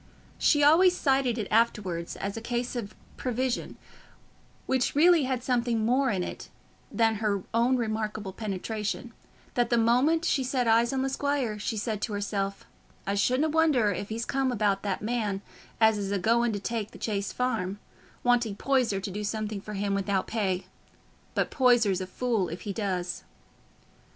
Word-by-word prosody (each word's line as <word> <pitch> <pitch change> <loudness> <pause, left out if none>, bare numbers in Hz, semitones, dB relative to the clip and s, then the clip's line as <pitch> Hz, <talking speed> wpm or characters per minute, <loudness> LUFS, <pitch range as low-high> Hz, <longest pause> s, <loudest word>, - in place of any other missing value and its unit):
She 290 -2 +4
always 355 +5 +6
cited 265 -4 +2
it 215 - -2
afterwards 205 -7 +1
as 200 0 -4
a 225 - -5
case 240 +2 -3
of 225 -4 -5 0.2
prevision, 255 0 -2 0.9
which 260 0 0
really 330 -1 +5
had 255 -2 -2
something 240 -3 +1
more 260 +3 +2
in 190 -5 0
it - - -7 0.4
than 225 -2 +2
her 200 -3 0
own 240 +3 +3
remarkable 215 -3 -3
penetration, 215 +3 -4 0.4
that 240 -1 +1
the 235 - +3
moment 255 +9 +3
she 275 -6 +2
set 255 -1 0
eyes 230 +1 +4
on 265 -1 0
the 270 - 0
squire 265 -6 -1
she 215 +2 -2
said 215 0 -2
to 220 - -2
herself, 200 -1 -3 0.4
"I 200 - -1
shouldna 255 +9 +2
wonder 300 -9 +3
if 200 +2 -4
he's 225 +2 -3
come 270 -1 0
about 205 -4 +1
that 200 -1 -3
man 210 -4 -1 0.4
as 220 -1 +4
is 200 -1 -3
a 200 - +1
going 230 +5 +2
to 205 - -2
take 220 0 -3
the - - -13
Chase 200 -2 -2
Farm, 220 -7 -1 0.5
wanting 240 -4 +2
Poyser 250 -4 +1
to 195 +1 -5
do 210 +3 -4
something 215 -1 -3
for 210 +1 -7
him 200 0 -1
without 195 -1 0
pay. 195 -5 -1 0.7
But - - 0
Poyser's 235 -8 +3
a 185 - -4
fool 220 -2 -1
if 170 - -6
he 205 - -4
does." 185 -4 -3
225 Hz, 170 wpm, -28 LUFS, 200-250 Hz, 0.9 s, always